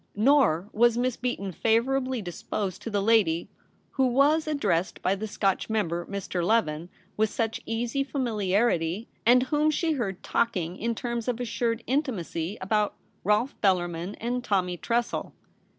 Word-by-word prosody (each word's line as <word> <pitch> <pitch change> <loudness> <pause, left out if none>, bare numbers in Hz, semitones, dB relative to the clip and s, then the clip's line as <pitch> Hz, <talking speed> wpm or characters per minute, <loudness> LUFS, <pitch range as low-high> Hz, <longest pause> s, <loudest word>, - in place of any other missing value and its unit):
Nor 215 - +3
was 235 +1 +4
Miss 250 0 +1
Beaton 200 -6 -3
favourably 250 +4 +1
disposed 185 +2 -4
to - - -5
the 205 -2 0
lady 200 -7 +2 0.4
who 265 -1 +2
was 290 +5 +3
ad 300 -2 -1
dressed 180 -6 0
by 185 - +3
the 205 +2 -4
Scotch 195 -1 0
member, 175 -6 -1
Mr. 195 -3 -3
Leven, 175 -5 +1 0.3
with 215 0 +2
such 225 +1 -2
easy 240 +4 -1
familiarity, 210 - 0 0.2
and 250 +1 +6
whom 300 +3 +2
she 320 +2 +1
heard 215 - -3
talking 180 -7 0
in 230 +4 -2
terms 235 -1 -3
of 245 -1 -1
assured 230 -1 -1
intimacy 210 - -2
about 210 +2 +1 0.2
' - - -40
Rolfe 210 +7 +2
Bellarmin' 175 -1 0
and 245 +2 -2
'Tommy 185 -5 0
Tressel.' 235 +5 -1
220 Hz, 150 wpm, -27 LUFS, 190-245 Hz, 0.4 s, and